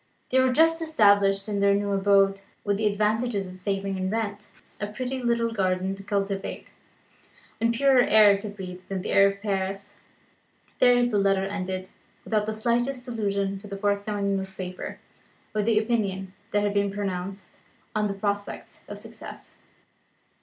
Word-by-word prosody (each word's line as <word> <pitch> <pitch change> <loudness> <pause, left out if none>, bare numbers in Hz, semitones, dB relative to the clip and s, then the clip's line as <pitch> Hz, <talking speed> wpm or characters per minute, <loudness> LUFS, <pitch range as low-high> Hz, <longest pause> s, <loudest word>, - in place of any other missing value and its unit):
They 260 - +4
were 260 0 +4
just 325 +4 +4
established 200 -9 +3
in 205 -1 -1
their 200 0 +4
new 200 0 -1
abode, 195 0 +3 0.2
with 200 -1 0
the 215 0 +1
advantages 210 0 0
of 185 0 -11
a - - -26
saving 195 0 -2
in 185 0 -1
rent, 210 -1 -3 0.3
a 205 - -2
pretty 255 +5 -4
little 235 -1 +1
garden 190 -2 0
to 195 - -9
cultivate, 195 -1 -3 0.9
and 230 +1 +2
purer 265 +1 +4
air 210 -3 +6
to 210 +1 -6
breathe 185 -3 -8
than 190 -2 -3
the - - -3
air 195 0 +6
of 200 +1 -4
Paris. 195 0 -3 0.8
There 245 -1 +5
the 220 -4 +1
letter 195 -1 +2
ended, 190 -1 -4 0.3
without 215 -1 0
the 220 - -1
slightest 240 +3 -1
allusion 200 -4 -1
to 205 - -11
the 200 -1 -6
forthcoming 200 0 0
newspaper, 190 -1 -6 0.6
or 215 - +1
to - - -2
the 225 -1 +3
opinion 200 -4 -1 0.2
that 205 -1 +1
had 205 0 0
been 200 0 +2
pronounced 195 -1 -5 0.3
on 215 -1 +1
the 200 - -3
prospects 205 0 -4
of - - -7
success. - - -11
200 Hz, 165 wpm, -26 LUFS, 195-220 Hz, 0.9 s, air